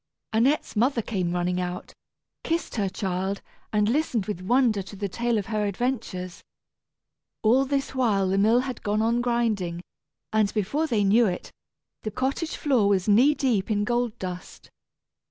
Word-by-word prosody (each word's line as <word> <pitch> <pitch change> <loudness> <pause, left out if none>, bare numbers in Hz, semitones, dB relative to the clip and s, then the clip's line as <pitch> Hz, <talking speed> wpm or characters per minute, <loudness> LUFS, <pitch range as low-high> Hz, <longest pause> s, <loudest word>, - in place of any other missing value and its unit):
Annette's 250 +7 +2
mother 235 +2 +2
came 185 -6 -2
running 180 +1 0
out, 180 0 -5 0.5
kissed 335 +1 -2
her 200 -3 +1
child, 190 +1 -3 0.3
and 210 -1 +2
listened 245 -5 0
with 195 -4 -4
wonder 235 0 +2
to 195 +2 -10
the 200 +1 -3
tale 235 +4 -1
of 205 - -2
her 215 -1 -1
adventures. 200 -5 -3 1.0
All 250 +5 +4
this 275 0 -1
while 215 -7 +2
the 195 +1 +1
mill 225 +4 +4
had 255 -2 -5
gone 210 +1 0
on 235 +2 +2
grinding, 220 -8 0 0.5
and 215 -2 +3
before 250 +10 0
they 220 -7 +1
knew 215 +4 +4
it 180 - -4 0.5
the 215 - -3
cottage 270 - -2
floor 250 -9 +2
was 190 -1 +1
knee 250 +8 +5
deep 235 -9 0
in 205 -1 +1
gold 240 0 -1
dust. 180 -3 -8
215 Hz, 160 wpm, -25 LUFS, 195-245 Hz, 1.0 s, knee